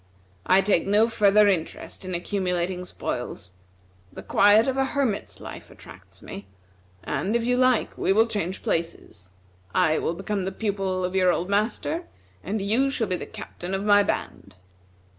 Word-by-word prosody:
I 190 +1 +6
take 195 -3 +1
no 210 +3 +4
further 210 -2 +4
interest 185 0 -2
in 185 -1 -4
accumulating 180 -1 -2
spoils. 90 - -5 0.6
The - - -10
quiet 205 +4 +5
of 265 - 0
a 270 - +2
hermit's 230 - -2
life - - -9
attracts - - -15
me; 100 0 -9 0.6
and, 170 +10 -2
if 235 -1 +1
you 250 +1 +2
like 255 -2 +2
we - - +1
will 220 +3 +5
change 200 -5 -3
places. 165 - -3 0.5
I 155 0 +3
will 170 - -2
become 195 +2 -3
the 190 +1 -3
pupil 195 -3 -2
of 180 - -4
your 185 -1 +4
old 180 +3 -2
master, 230 - -1 0.4
and 200 +2 -2
you 235 +7 +2
shall 255 -4 -1
be 185 -3 -1
the - - -6
captain 195 -4 -6
of 195 - -3
my 205 -1 +6
band." 100 - -4
195 Hz, 165 wpm, -25 LUFS, 180-220 Hz, 0.6 s, I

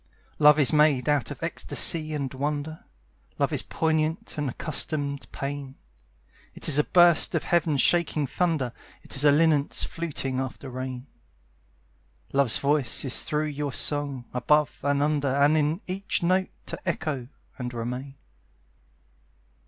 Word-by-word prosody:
Love 150 -1 +7
is 145 0 +3
made 150 -3 +3
out 145 -5 +1
of - - -7
ecstasy 155 -2 +2
and 140 -3 -3
wonder; 145 +3 -4 0.5
Love - - 0
is - - 0
a - - -17
poignant 160 +1 -1
and 145 -3 -2
accustomed 145 0 -2
pain. 140 -1 -6 0.8
It - - -3
is 150 -1 +4
a - - +4
burst 175 -2 +4
of - - 0
Heaven 165 -4 +1
shaking 160 -1 +2
thunder; 150 -4 -1 0.3
It - - -5
is 135 - +4
a 145 - +7
linnet's 150 -1 +2
fluting 140 -6 -3
after 130 0 -6
rain. 130 0 -6 1.3
Love's 135 -4 +3
voice 140 -3 +1
is 130 - +4
through 150 0 -1
your 145 -2 -4
song; 140 -4 0
above 150 +4 +1
and 145 0 +1
under 145 -1 0
And 145 +2 +4
in 155 +4 0
each 190 0 -2
note 185 +2 +1 0.2
to - - -5
echo 155 -7 -3 0.3
and 125 -1 -4
remain. 125 +3 -6
145 Hz, 145 wpm, -25 LUFS, 135-155 Hz, 1.3 s, Love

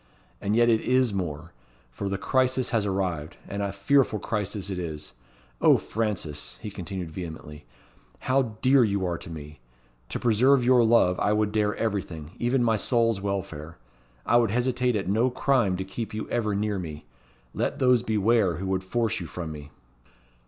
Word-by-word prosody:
"And 105 +2 0
yet 120 0 +5
it 115 -2 +3
is 130 -3 +2
more; 85 -3 -4 0.4
for 100 +11 -4
the 100 - -1
crisis 130 +2 +1
has 110 -3 +1
arrived, 90 -6 -2
and 100 +1 -4
a 100 -1 -1
fearful 110 +4 +2
crisis 100 -2 -3
it 90 - -3
is. 75 -3 -6 0.5
O, - - +6
Frances!" 100 -9 -4
he 105 -2 -7
continued 95 -3 -6
vehemently, 80 -4 -8 0.6
"how 130 -4 0
dear 130 0 +6
you 100 -3 0
are 85 -2 -2
to - - -9
me. 75 -2 -9 0.5
To - - -2
preserve 120 +3 +4
your 125 -1 +5
love 110 -6 +4
I 105 - +2
would 105 -1 +1
dare 105 -1 +1
everything, 90 -8 -3
even 120 +1 +2
my 115 -2 +2
soul's 115 -2 +1
welfare. 95 -6 -4 0.5
I 120 - +4
would 120 -1 +3
hesitate 125 +2 +1
at 100 - -2
no 110 +6 +2
crime 125 -7 +1
to 95 - -3
keep 105 +3 -5
you 110 - -4
ever 110 -4 0
near 105 -1 -1
me. 75 -4 -7 0.5
Let - - -1
those 125 -4 +4
beware 110 -4 +2
who 95 +4 -5
would 95 0 -1
force 115 +2 -1
you 85 - -6
from 80 0 -6
me." 75 -1 -9
105 Hz, 175 wpm, -26 LUFS, 90-120 Hz, 0.6 s, O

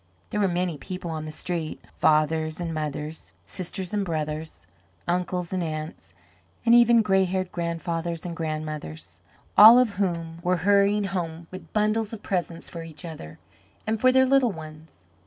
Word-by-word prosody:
There 210 - -1
were 200 - +3
many 175 -3 -1
people 180 -1 -6
on 155 -1 -4
the 155 - -6
street, 165 0 -3 0.2
fathers 155 +1 +2
and 170 -2 -3
mothers, 155 0 -5
sisters 185 0 -5
and 205 -1 +1
brothers, 155 -2 -4 0.4
uncles 180 0 -1
and 185 - 0
aunts, 155 - -6 0.5
and 230 - +5
even 235 -1 +6
gray 190 -2 +3
haired 185 0 -2
grandfathers 170 0 -3
and 170 -1 -4
grandmothers, 155 - -5 0.4
all 220 +3 +10
of 235 -6 +2
whom 170 -4 -2
were 180 +1 +1
hurrying 205 +1 +4
home 170 -4 -4
with 185 - -10
bundles 215 +1 0
of 215 - -8
presents 175 -3 -2
for 170 - -7
each 165 +1 -9
other 80 - -9 0.5
and 220 0 -1
for 255 - +6
their 260 0 +5
little 265 -3 +3
ones. 155 - -12
175 Hz, 160 wpm, -25 LUFS, 155-200 Hz, 0.5 s, all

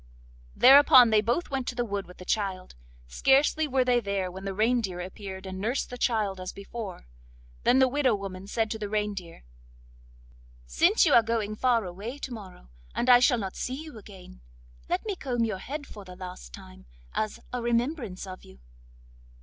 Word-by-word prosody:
Thereupon 260 -2 +8
they 215 -1 +5
both 240 +10 -1
went 265 -2 -2
to 245 - -3
the 240 0 -1
wood 200 -2 -4
with 180 - -14
the 180 - -11
child; 190 -3 -2 0.3
scarcely 275 - +2
were 260 -2 +1
they 245 -1 +3
there 200 -4 -2
when 190 +2 -9
the 195 - -3
reindeer 215 -4 0
appeared 190 +1 -7
and 190 0 -6
nursed 235 +7 -2
the - - -5
child 210 -6 0
as 185 - -5
before. 200 - -8 0.6
Then 250 - +5
the 265 0 +5
widow 260 -3 +2
woman 195 -1 -7
said 220 +1 -1
to 220 - -4
the 205 -1 -4
reindeer: 205 - -4 1.2
'Since - - +3
you - - +3
are 235 - +8
going 220 -2 -2
far 235 -2 +2
away 200 +9 -7
to 265 -3 -6
morrow, 185 - -11 0.2
and 250 - +3
I 245 - +9
shall 250 0 +4
not 195 -4 -5
see 255 - -3
you 310 -7 -9
again, 190 - -14 0.5
let - - -1
me 415 -3 -2
comb 245 -8 -2
your 210 -4 -3
head 290 +7 -6
for 210 -6 -11
the 180 -1 -11
last 180 - -9
time, 60 0 -13 0.3
as 215 -1 -2
a 250 - -2
remembrance 235 - -1
of 185 -1 -9
you. 65 - -16
215 Hz, 190 wpm, -27 LUFS, 190-245 Hz, 1.2 s, I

